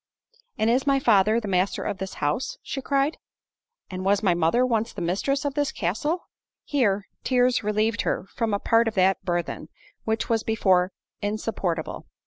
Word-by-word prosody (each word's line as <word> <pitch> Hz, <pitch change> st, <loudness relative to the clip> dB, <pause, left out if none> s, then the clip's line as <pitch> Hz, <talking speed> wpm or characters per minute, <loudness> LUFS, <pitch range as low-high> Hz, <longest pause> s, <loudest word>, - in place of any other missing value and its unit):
"And 220 Hz, +1 st, +2 dB
is 260 Hz, +3 st, +1 dB
my 275 Hz, -1 st, +4 dB
father 220 Hz, -3 st, +4 dB
the 220 Hz, -, -6 dB
master 185 Hz, 0 st, 0 dB
of 190 Hz, -, -3 dB
this 190 Hz, 0 st, -5 dB
house?" 145 Hz, -, -1 dB
she 270 Hz, -, -4 dB
cried—"and 275 Hz, -, -4 dB
was 200 Hz, +2 st, +2 dB
my 190 Hz, -4 st, +4 dB
mother 170 Hz, +9 st, +2 dB
once 230 Hz, -2 st, 0 dB
the -, -, -8 dB
mistress 270 Hz, -, 0 dB
of 285 Hz, -, -1 dB
this 290 Hz, 0 st, 0 dB
castle?" 225 Hz, -, -2 dB, 0.4 s
Here 205 Hz, -8 st, +1 dB, 0.2 s
tears 250 Hz, -2 st, +2 dB
relieved 210 Hz, +1 st, +1 dB
her -, -, -1 dB
from 225 Hz, -2 st, -1 dB
a 205 Hz, -, +2 dB
part 230 Hz, +3 st, +3 dB
of 225 Hz, -, -2 dB
that 190 Hz, 0 st, +3 dB
burthen, 175 Hz, -2 st, -3 dB, 0.4 s
which 220 Hz, 0 st, -1 dB
was 225 Hz, -1 st, +1 dB
before 190 Hz, -5 st, +2 dB, 0.3 s
insupportable. 205 Hz, -6 st, -3 dB
215 Hz, 165 wpm, -25 LUFS, 190-250 Hz, 0.4 s, my